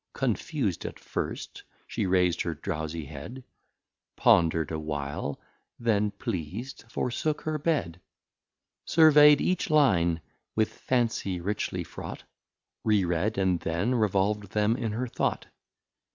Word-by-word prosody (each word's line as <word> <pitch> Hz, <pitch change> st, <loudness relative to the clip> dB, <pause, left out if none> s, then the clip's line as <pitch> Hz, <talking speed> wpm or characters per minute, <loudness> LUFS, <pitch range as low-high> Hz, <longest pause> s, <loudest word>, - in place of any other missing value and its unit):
Confus'd -, -, -1 dB
at -, -, -6 dB
first, -, -, -5 dB, 0.2 s
she -, -, -2 dB
rais'd 90 Hz, -2 st, +2 dB
her -, -, -2 dB
drowsie 80 Hz, 0 st, -4 dB
Head, 80 Hz, -, -8 dB, 0.7 s
Ponder'd 80 Hz, -2 st, +3 dB
a 80 Hz, -, -2 dB
while, 70 Hz, -2 st, -4 dB, 0.4 s
then 105 Hz, -3 st, +1 dB
pleas'd, 100 Hz, -, -5 dB
forsook 150 Hz, +7 st, -1 dB
her 155 Hz, -1 st, -2 dB
Bed. 140 Hz, -, -1 dB, 0.8 s
Survey'd 150 Hz, -2 st, +7 dB
each 185 Hz, -1 st, 0 dB
Line 90 Hz, -, +4 dB, 0.4 s
with 110 Hz, -1 st, +1 dB
Fancy 115 Hz, -7 st, -1 dB
richly 100 Hz, +4 st, -2 dB
fraught, -, -, -8 dB, 0.6 s
Re 105 Hz, -4 st, +3 dB
read, 90 Hz, +5 st, 0 dB
and 95 Hz, -3 st, +2 dB
then 85 Hz, +10 st, -1 dB
revolv'd 105 Hz, -2 st, +1 dB
them 105 Hz, +1 st, +2 dB
in 115 Hz, -3 st, -2 dB
her 120 Hz, +4 st, -1 dB
Thought. 120 Hz, -, -1 dB
105 Hz, 120 wpm, -28 LUFS, 85-120 Hz, 0.8 s, Survey'd